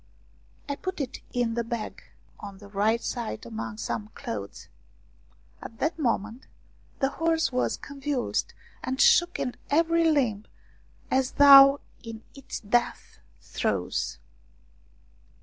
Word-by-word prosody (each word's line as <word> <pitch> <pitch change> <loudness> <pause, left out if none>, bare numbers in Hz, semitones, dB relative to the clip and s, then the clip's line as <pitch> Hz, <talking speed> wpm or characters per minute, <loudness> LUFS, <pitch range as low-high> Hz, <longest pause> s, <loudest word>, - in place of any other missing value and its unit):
I 285 - -2
put 370 +2 -5
it 270 -4 -4
in 240 -2 0
the 235 0 -1
bag 230 -1 -5 0.4
on 200 -1 -9
the 205 +1 -13
right 215 +3 +1
side 230 - -4
among 110 -1 -6
some 110 -1 -4
clothes. 100 -3 -6 0.9
At 225 - -10
that 320 +6 -1
moment 235 -2 -2 0.5
the 270 - +1
horse 325 +1 0
was 250 0 0
convulsed 280 -2 -3 0.3
and 260 +1 -3
shook 345 +3 +5
in 250 - -2 0.2
every 330 +2 +3
limb 240 -9 +1 0.7
as 260 -1 +1
though 275 0 +9 0.2
in 225 -1 -9
its 275 -2 -8
death 240 +3 -1 0.2
throes. 60 0 -2
245 Hz, 120 wpm, -27 LUFS, 210-285 Hz, 0.9 s, though